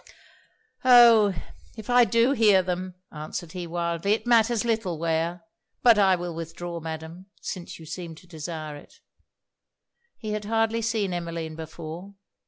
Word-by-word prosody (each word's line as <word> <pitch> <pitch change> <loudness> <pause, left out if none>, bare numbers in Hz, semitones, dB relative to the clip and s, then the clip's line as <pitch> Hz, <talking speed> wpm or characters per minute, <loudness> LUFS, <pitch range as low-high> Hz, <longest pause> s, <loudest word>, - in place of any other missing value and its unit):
'Oh! 235 -4 +7 0.5
if 220 - -9
I 245 -1 +5
do 230 +3 +3
hear 210 -7 +4
them,' 180 0 -4 0.2
answered 155 +2 -6
he, 180 -1 -6
wildly, 170 +3 -1
'it 225 - -2
matters 235 -1 +3
little 220 -7 -1
where. 165 +2 -1 0.4
But 235 -3 +6
I 190 -2 +5
will 175 -1 -5
withdraw, 165 +1 -6
Madam, 160 +3 -7
since 180 -3 -7
you 160 - -12
seem 170 0 -7
to 170 - -17
desire 155 -2 -6
it.' 145 - -14 1.2
He 215 -2 -5
had 210 0 -3
hardly 225 +1 +1
seen 215 -4 -1
Emmeline 165 -2 -4
before. 165 +4 -8
180 Hz, 145 wpm, -25 LUFS, 165-220 Hz, 1.2 s, Oh